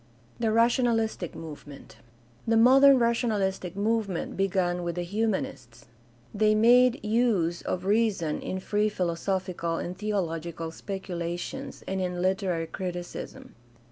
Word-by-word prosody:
The 225 Hz, -2 st, +1 dB
rationalistic 230 Hz, -4 st, +1 dB
movement. 150 Hz, -3 st, -10 dB, 0.2 s
— 120 Hz, -, -30 dB
The 225 Hz, 0 st, +3 dB
modern 270 Hz, +4 st, +7 dB
rationalistic 215 Hz, -6 st, 0 dB
movement 205 Hz, -3 st, -1 dB
began 180 Hz, -2 st, 0 dB
with 170 Hz, -1 st, -3 dB
the 175 Hz, -, -2 dB
Humanists. 175 Hz, -, -3 dB, 0.5 s
They 215 Hz, +1 st, +3 dB
made 245 Hz, +2 st, +5 dB
use 210 Hz, -7 st, +1 dB
of 180 Hz, 0 st, -3 dB
reason 200 Hz, -7 st, +1 dB
in 185 Hz, -, -4 dB
free 210 Hz, +2 st, +1 dB
philosophical 180 Hz, -2 st, -2 dB
and 175 Hz, +2 st, -4 dB
theological 170 Hz, -5 st, -3 dB
speculations 180 Hz, +7 st, -5 dB
and 190 Hz, 0 st, -2 dB
in 180 Hz, -1 st, -2 dB
literary 185 Hz, -2 st, 0 dB
criticism. 175 Hz, +1 st, -6 dB
190 Hz, 115 wpm, -27 LUFS, 175-225 Hz, 0.5 s, modern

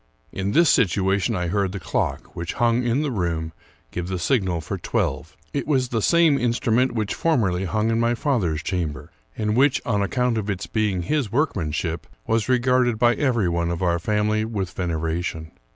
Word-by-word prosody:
In 95 Hz, +1 st, -2 dB
this 170 Hz, -2 st, +5 dB
situation 100 Hz, 0 st, +2 dB
I 90 Hz, -2 st, -1 dB
heard 100 Hz, 0 st, 0 dB
the 100 Hz, -, -4 dB
clock, -, -, -3 dB
which 85 Hz, 0 st, -4 dB
hung 120 Hz, 0 st, +2 dB
hi 120 Hz, +3 st, +1 dB
the 145 Hz, -, -1 dB
room, 85 Hz, -6 st, -2 dB, 0.4 s
give 90 Hz, 0 st, -4 dB
the 95 Hz, 0 st, -2 dB
signal 95 Hz, -3 st, +1 dB
for 80 Hz, -, -5 dB
twelve. 75 Hz, +2 st, -2 dB, 0.2 s
It 140 Hz, -2 st, -2 dB
was 130 Hz, -4 st, +1 dB
the 115 Hz, -3 st, -1 dB
same 165 Hz, 0 st, +4 dB
instrument 120 Hz, +1 st, +1 dB
which 110 Hz, -3 st, -1 dB
formerly 100 Hz, -, +1 dB
hung 110 Hz, +4 st, 0 dB
in 115 Hz, -, +1 dB
my 120 Hz, +1 st, +2 dB
father's 100 Hz, -, 0 dB
chamber, 80 Hz, -5 st, -3 dB, 0.3 s
and 105 Hz, -1 st, 0 dB
which, 135 Hz, +2 st, +4 dB
on 105 Hz, -4 st, +1 dB
ac 100 Hz, -, -1 dB
count 125 Hz, -3 st, +1 dB
of 105 Hz, -1 st, -4 dB
its 95 Hz, -3 st, -2 dB
being 105 Hz, -5 st, -1 dB
his 135 Hz, -, -1 dB
workmanship, 85 Hz, -, -1 dB, 0.2 s
was 115 Hz, +1 st, 0 dB
regarded 125 Hz, -2 st, +2 dB
by 120 Hz, +1 st, +4 dB
every 120 Hz, -9 st, +1 dB
one 85 Hz, 0 st, 0 dB
of 85 Hz, +1 st, -2 dB
our 85 Hz, -1 st, +2 dB
family 105 Hz, +3 st, +1 dB
with 100 Hz, -5 st, -3 dB
veneration. 80 Hz, -2 st, -3 dB
105 Hz, 185 wpm, -23 LUFS, 90-120 Hz, 0.4 s, this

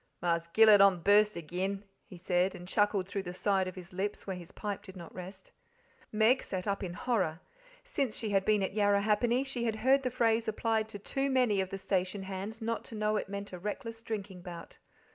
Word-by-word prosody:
"Marse 170 Hz, -1 st, 0 dB
Gillet 215 Hz, +2 st, +7 dB
on 200 Hz, -1 st, +7 dB
the 175 Hz, -, -11 dB
burst 210 Hz, +2 st, +4 dB
agen," 185 Hz, +5 st, -3 dB, 0.2 s
he 180 Hz, -, -11 dB
said, 180 Hz, +1 st, +1 dB
and 180 Hz, -, -10 dB
chuckled 205 Hz, -1 st, +1 dB
through 195 Hz, 0 st, -3 dB
the 180 Hz, -1 st, -7 dB
side 190 Hz, -1 st, +1 dB
of 185 Hz, -, -6 dB
his 185 Hz, -1 st, -10 dB
lips 200 Hz, +3 st, -3 dB
where 190 Hz, -, -3 dB
his 175 Hz, -2 st, -10 dB
pipe 205 Hz, -2 st, -4 dB
did 190 Hz, -1 st, -12 dB
not 170 Hz, -2 st, -10 dB
rest. 190 Hz, +1 st, -9 dB, 0.6 s
Meg 220 Hz, +4 st, +4 dB
sat 185 Hz, 0 st, -4 dB
up 200 Hz, 0 st, -1 dB
in 180 Hz, -3 st, -4 dB
horror. 190 Hz, -11 st, 0 dB, 0.4 s
Since 280 Hz, -, -2 dB
she 220 Hz, -2 st, -2 dB
had 195 Hz, -1 st, +3 dB
been 210 Hz, -1 st, +2 dB
at 190 Hz, -, -2 dB
Yarrahappini 210 Hz, +4 st, +2 dB
she 250 Hz, -3 st, -3 dB
had 225 Hz, -2 st, 0 dB
heard 265 Hz, +5 st, +3 dB
the 255 Hz, -, -1 dB
phrase 230 Hz, -2 st, +1 dB
applied 220 Hz, 0 st, 0 dB
to 205 Hz, -, -6 dB
too 270 Hz, +7 st, -2 dB
many 250 Hz, -7 st, +3 dB
of 190 Hz, -, -3 dB
the 195 Hz, -, -4 dB
station 190 Hz, 0 st, -1 dB
hands: 195 Hz, +4 st, -5 dB
not 230 Hz, 0 st, -2 dB
to 225 Hz, -, -7 dB
know 215 Hz, 0 st, 0 dB
that 215 Hz, -, +2 dB
it -, -, -12 dB
meant 200 Hz, -1 st, -6 dB
a 180 Hz, -, -6 dB
reckless 225 Hz, +4 st, -5 dB
drinking 200 Hz, -5 st, -5 dB
bout. 175 Hz, -1 st, -9 dB
200 Hz, 220 wpm, -31 LUFS, 185-220 Hz, 0.6 s, Gillet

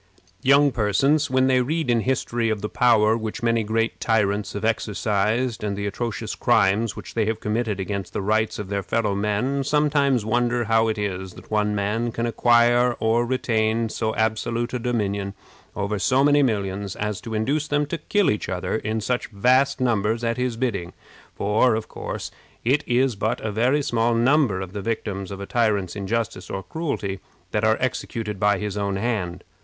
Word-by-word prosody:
Young 140 Hz, +2 st, +5 dB
persons, 130 Hz, +8 st, +2 dB
when 130 Hz, 0 st, +3 dB
they 130 Hz, -1 st, +3 dB
read 155 Hz, +4 st, -1 dB
in 120 Hz, -, +3 dB
history 120 Hz, -1 st, 0 dB
of 110 Hz, -2 st, -1 dB
the 105 Hz, -, -3 dB
power 110 Hz, -3 st, +4 dB
which 110 Hz, 0 st, -5 dB
many 115 Hz, -1 st, +2 dB
great 115 Hz, +2 st, -1 dB
tyrants 105 Hz, -2 st, 0 dB
have 105 Hz, +1 st, -3 dB
exercised, 110 Hz, +2 st, 0 dB
and 100 Hz, -2 st, -2 dB
the 100 Hz, -, -3 dB
atrocious 110 Hz, +1 st, -3 dB
crimes 110 Hz, -2 st, +2 dB
which -, -, -9 dB
they 110 Hz, -2 st, +1 dB
have 110 Hz, 0 st, -1 dB
committed 105 Hz, -2 st, -1 dB
against 100 Hz, -1 st, -4 dB
the 100 Hz, -, -3 dB
rights 110 Hz, +2 st, +1 dB
of 100 Hz, -2 st, -6 dB
their 100 Hz, -1 st, -1 dB
fellow 105 Hz, +1 st, 0 dB
men, 105 Hz, +7 st, 0 dB
sometimes 140 Hz, -4 st, +2 dB
wonder 120 Hz, +2 st, +1 dB
how 115 Hz, 0 st, +2 dB
it 110 Hz, -1 st, -1 dB
is 95 Hz, -3 st, -3 dB
that -, -, -14 dB
one 105 Hz, -1 st, +1 dB
man 105 Hz, +4 st, -1 dB
can 115 Hz, +1 st, -2 dB
acquire 120 Hz, +1 st, +4 dB
or 115 Hz, +2 st, +2 dB
retain 115 Hz, -2 st, 0 dB
so 110 Hz, 0 st, -2 dB
absolute 115 Hz, +2 st, -1 dB
a 125 Hz, -, -1 dB
dominion 100 Hz, -5 st, -2 dB, 0.4 s
over 100 Hz, 0 st, -2 dB
so 130 Hz, +7 st, +3 dB
many 145 Hz, 0 st, +5 dB
millions 100 Hz, -5 st, -1 dB
as 105 Hz, 0 st, -3 dB
to 110 Hz, 0 st, -5 dB
induce 140 Hz, +8 st, 0 dB
them 145 Hz, 0 st, +1 dB
to 165 Hz, +3 st, -4 dB
kill 205 Hz, -3 st, +2 dB
each 105 Hz, -, -3 dB
other 90 Hz, +3 st, -2 dB
in 110 Hz, 0 st, -2 dB
such 125 Hz, +3 st, -1 dB
vast 130 Hz, +7 st, +2 dB
numbers 115 Hz, -2 st, +1 dB
at 115 Hz, 0 st, 0 dB
his 125 Hz, -2 st, -2 dB
bidding; 100 Hz, -9 st, -2 dB, 0.4 s
for, 110 Hz, +4 st, +2 dB
of 110 Hz, 0 st, -4 dB
course, -, -, -6 dB, 0.3 s
it 140 Hz, +5 st, +2 dB
is 125 Hz, 0 st, +2 dB
but 105 Hz, +2 st, -1 dB
a 110 Hz, -, -2 dB
very 125 Hz, +7 st, +2 dB
small 115 Hz, -2 st, +1 dB
number 120 Hz, -5 st, +3 dB
of 95 Hz, -1 st, -7 dB
the 100 Hz, -, -4 dB
victims 100 Hz, -3 st, -3 dB
of 100 Hz, -1 st, -7 dB
a 100 Hz, -, -5 dB
tyrant's 105 Hz, -6 st, 0 dB
injustice 100 Hz, -2 st, -3 dB
or 95 Hz, -, -4 dB
cruelty 100 Hz, -, -3 dB, 0.3 s
that 105 Hz, -, 0 dB
are 110 Hz, 0 st, +3 dB
executed 115 Hz, -5 st, -3 dB
by 105 Hz, +1 st, +3 dB
his 105 Hz, -2 st, -4 dB
own 100 Hz, -1 st, -1 dB
hand. 95 Hz, -5 st, -2 dB
110 Hz, 185 wpm, -23 LUFS, 105-120 Hz, 0.4 s, Young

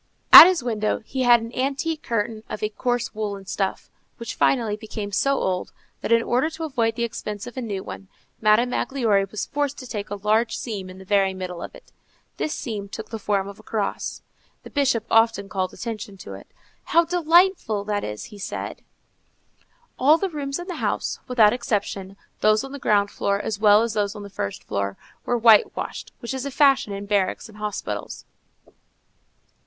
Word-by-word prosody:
At -, -, +14 dB
his 365 Hz, -8 st, +1 dB
window 220 Hz, -2 st, -1 dB
he 265 Hz, +2 st, -3 dB
had 240 Hz, -2 st, +6 dB
an 230 Hz, +1 st, -8 dB
antique 280 Hz, +4 st, -1 dB
curtain 220 Hz, -3 st, -2 dB
of 210 Hz, -, -5 dB
a 215 Hz, -, +1 dB
coarse 245 Hz, +2 st, -2 dB
woollen 205 Hz, -2 st, -4 dB
stuff, 195 Hz, 0 st, -3 dB, 0.3 s
which 235 Hz, -, -6 dB
finally 230 Hz, -6 st, +1 dB
became 210 Hz, -1 st, -6 dB
so 275 Hz, +8 st, +2 dB
old, 185 Hz, -7 st, -2 dB, 0.3 s
that, -, -, -3 dB
in 230 Hz, 0 st, +5 dB
order 255 Hz, +7 st, +1 dB
to 325 Hz, 0 st, -7 dB
avoid 230 Hz, -7 st, 0 dB
the 235 Hz, -, -2 dB
expense 210 Hz, -3 st, -5 dB
of 245 Hz, -, -9 dB
a 260 Hz, -, -3 dB
new 205 Hz, -5 st, -4 dB
one, 195 Hz, -, -9 dB, 0.3 s
Madame 220 Hz, +3 st, +4 dB
Magloire 220 Hz, -9 st, +1 dB
was 215 Hz, -, -4 dB
forced 285 Hz, -1 st, -2 dB
to 260 Hz, -, -8 dB
take 210 Hz, -4 st, -5 dB
a 205 Hz, -, -3 dB
large 215 Hz, +3 st, +1 dB
seam 200 Hz, -6 st, -5 dB
in 185 Hz, -, -11 dB
the 190 Hz, -, -12 dB
very 195 Hz, -1 st, +2 dB
middle 180 Hz, -2 st, -6 dB
of -, -, -8 dB
it. -, -, -17 dB, 0.5 s
This 305 Hz, -, -2 dB
seam 210 Hz, -7 st, -5 dB
took 220 Hz, -, -7 dB
the 225 Hz, -, -4 dB
form 200 Hz, -1 st, 0 dB
of 200 Hz, +1 st, -10 dB
a -, -, -12 dB
cross. 215 Hz, -2 st, -3 dB, 0.4 s
The -, -, -12 dB
Bishop 260 Hz, -6 st, +1 dB
often 225 Hz, -3 st, +3 dB
called 185 Hz, -1 st, -2 dB
attention 215 Hz, -4 st, -6 dB
to 100 Hz, -, -9 dB
it: 95 Hz, -, -11 dB, 0.4 s
"How 335 Hz, 0 st, +3 dB
delightful 340 Hz, -, +3 dB
that 205 Hz, 0 st, -2 dB
is!" 105 Hz, 0 st, -5 dB
he 205 Hz, -, -11 dB
said. -, -, -5 dB, 1.2 s
All 295 Hz, +5 st, +6 dB
the 390 Hz, +2 st, -2 dB
rooms 280 Hz, -4 st, -4 dB
in 350 Hz, -, -7 dB
the 360 Hz, -2 st, -6 dB
house, -, -, -2 dB
without 225 Hz, -4 st, +5 dB
exception, 200 Hz, -5 st, -3 dB, 0.2 s
those 215 Hz, 0 st, +3 dB
on 270 Hz, -, -8 dB
the 280 Hz, -, -7 dB
ground 205 Hz, -4 st, +2 dB
floor 200 Hz, 0 st, -1 dB
as 210 Hz, 0 st, -3 dB
well 210 Hz, 0 st, +6 dB
as 230 Hz, -1 st, -2 dB
those 205 Hz, -1 st, -1 dB
on 205 Hz, -, -7 dB
the 200 Hz, -, -10 dB
first 100 Hz, -, -4 dB
floor, 100 Hz, 0 st, -3 dB, 0.3 s
were 245 Hz, -, +2 dB
white 225 Hz, -2 st, +5 dB
washed, -, -, -6 dB
which 235 Hz, +1 st, -4 dB
is 265 Hz, -1 st, -4 dB
a 280 Hz, -, -3 dB
fashion 275 Hz, -5 st, +3 dB
in 200 Hz, 0 st, -5 dB
barracks 200 Hz, -2 st, 0 dB
and 215 Hz, -1 st, -15 dB
hospitals. 210 Hz, -1 st, -5 dB
220 Hz, 195 wpm, -23 LUFS, 200-255 Hz, 1.2 s, At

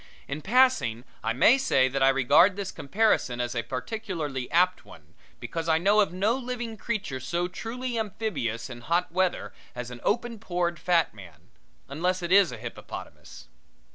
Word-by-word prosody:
In 145 Hz, +3 st, -4 dB
passing 230 Hz, -, +3 dB, 0.2 s
I 115 Hz, -, 0 dB
may 220 Hz, -, +5 dB
say 135 Hz, -, +3 dB
that 135 Hz, +1 st, -2 dB
I 135 Hz, -, +6 dB
regard 135 Hz, +8 st, +5 dB
this 200 Hz, -1 st, -4 dB
comparison 145 Hz, -, +1 dB
as 120 Hz, 0 st, -2 dB
a 120 Hz, -, -1 dB
particularly 140 Hz, -, -4 dB
apt 180 Hz, +3 st, +2 dB
one, 80 Hz, +1 st, -16 dB, 0.3 s
because 165 Hz, 0 st, -4 dB
I 160 Hz, -, +4 dB
know 200 Hz, +5 st, +3 dB
of 200 Hz, -6 st, +3 dB
no 200 Hz, +6 st, +1 dB
living 245 Hz, -3 st, -5 dB
creature 205 Hz, -, -3 dB
so 170 Hz, +7 st, -2 dB
truly 235 Hz, +5 st, -4 dB
amphibious 180 Hz, -, -3 dB
in 120 Hz, -2 st, -9 dB
hot 170 Hz, +8 st, 0 dB
weather 185 Hz, +1 st, 0 dB, 0.2 s
as 125 Hz, 0 st, -6 dB
an 120 Hz, -1 st, -9 dB
open 235 Hz, +1 st, -1 dB
pored 175 Hz, -4 st, -2 dB
fat 175 Hz, -2 st, +2 dB
man, 85 Hz, -8 st, -15 dB, 0.4 s
unless 180 Hz, +6 st, -1 dB
it 170 Hz, -, -3 dB
is 195 Hz, -2 st, +6 dB
a -, -, -7 dB
hippopotamus. -, -, -9 dB
175 Hz, 170 wpm, -27 LUFS, 130-215 Hz, 0.4 s, I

